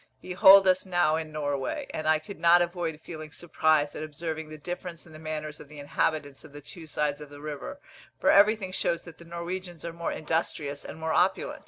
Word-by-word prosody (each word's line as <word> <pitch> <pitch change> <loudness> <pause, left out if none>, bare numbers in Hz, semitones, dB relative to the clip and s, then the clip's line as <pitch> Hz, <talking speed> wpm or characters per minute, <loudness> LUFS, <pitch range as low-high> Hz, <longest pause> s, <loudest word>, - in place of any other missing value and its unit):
Behold 190 +1 +7
us 185 0 +4
now 175 -4 +2
in 160 -1 -4
Norway; 145 - -2
and 155 0 -3
I 155 0 +5
could 155 +6 -10
not 175 +1 +6
avoid 170 -3 -3
feeling 155 -2 -8
surprise 155 -3 +1
at - - -5
observing 155 +1 -5
the 155 - -8
difference 175 +2 -7
in 160 - -15
the 155 - -11
manners 155 -1 -5
of 145 - -12
the 150 - -12
inhabitants 145 0 -2
of 145 - -14
the 145 - -8
two 160 +3 -10
sides 150 -1 -1
of 150 - -9
the 145 0 -12
river, 150 - -6 0.4
for - - +4
everything 205 -1 +4
shows 170 -2 -1
that 170 -2 -13
the 170 - -13
Norwegians 170 0 -6
are 170 - -5
more 170 0 -3
industrious 150 -2 -2
and - - -8
more 160 0 -2
opulent. 310 - +1
160 Hz, 210 wpm, -28 LUFS, 150-175 Hz, 0.4 s, Behold